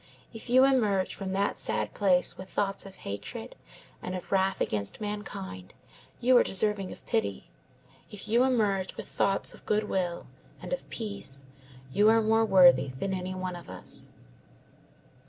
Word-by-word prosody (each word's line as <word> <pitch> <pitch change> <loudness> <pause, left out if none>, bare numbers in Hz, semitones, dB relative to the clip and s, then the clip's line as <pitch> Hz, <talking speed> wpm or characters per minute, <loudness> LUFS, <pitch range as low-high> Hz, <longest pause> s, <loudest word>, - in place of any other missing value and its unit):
If 225 +2 -9
you 255 +2 +6
emerge 215 -9 +2
from 195 -1 -5
that 200 +1 0
sad - - -2
place 185 -3 +3
with 190 0 -10
thoughts 195 -1 -2
of 195 - -12
hatred 100 +1 -6 0.5
and 185 - -4
of 180 - -8
wrath 190 0 +2
against 100 -2 -2
mankind, 95 - -6 0.4
you 250 +1 +4
are - - +7
deserving 195 -1 +1
of - - -12
pity; 225 -2 -2 0.6
if 210 -1 -9
you 235 +3 +4
emerge 210 -7 +1
with - - -7
thoughts 195 0 +1
of - - -14
good 215 0 +1
will 180 -4 -2 0.3
and - - -5
of - - -5
peace, 200 - -1 0.5
you 210 +1 +5
are 225 0 +4
more 225 +1 +3
worthy 180 -7 +6
than 135 +10 -4
any 185 0 -3
one 185 -1 -4
of 175 - -11
us." 95 -1 -6
195 Hz, 160 wpm, -29 LUFS, 180-215 Hz, 0.6 s, are